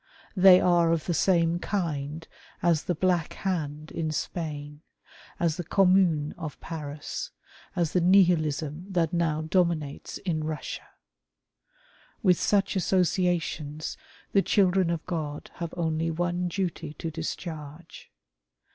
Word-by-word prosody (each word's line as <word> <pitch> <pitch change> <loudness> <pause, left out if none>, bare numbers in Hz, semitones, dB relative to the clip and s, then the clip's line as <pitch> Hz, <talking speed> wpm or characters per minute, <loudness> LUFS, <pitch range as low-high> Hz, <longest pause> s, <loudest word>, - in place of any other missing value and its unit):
They 185 -1 +8
are 170 -2 +4
of 165 -2 0
the 175 - 0
same 170 0 +2
kind 160 -5 -3 0.4
as 170 -3 +2
the 180 - 0
Black 175 -1 +1
Hand 155 -5 -3
in 160 -1 -2
Spain, 150 -2 -4 0.6
as 165 -1 +1
the 175 - -3
Commune 180 -4 +3
of 155 -4 -6
Paris, 155 - -6 0.5
as 170 -4 0
the 180 - +3
Nihilism 170 -3 +3
that 170 -3 +1
now 160 -2 +1
dominates 160 -4 0
in 175 -5 -2
Eussia. 155 0 -5 1.4
With 180 -4 +4
such 205 0 +2
associations 175 -5 0 0.4
the 195 - +4
children 190 -3 +3
of 170 -2 -2
God 155 -4 -4
have 170 -2 -4
only 165 -1 0
one 175 +2 -1
duty 175 -4 -3
to 165 - -5
discharge. 160 -1 -7
170 Hz, 120 wpm, -27 LUFS, 155-180 Hz, 1.4 s, They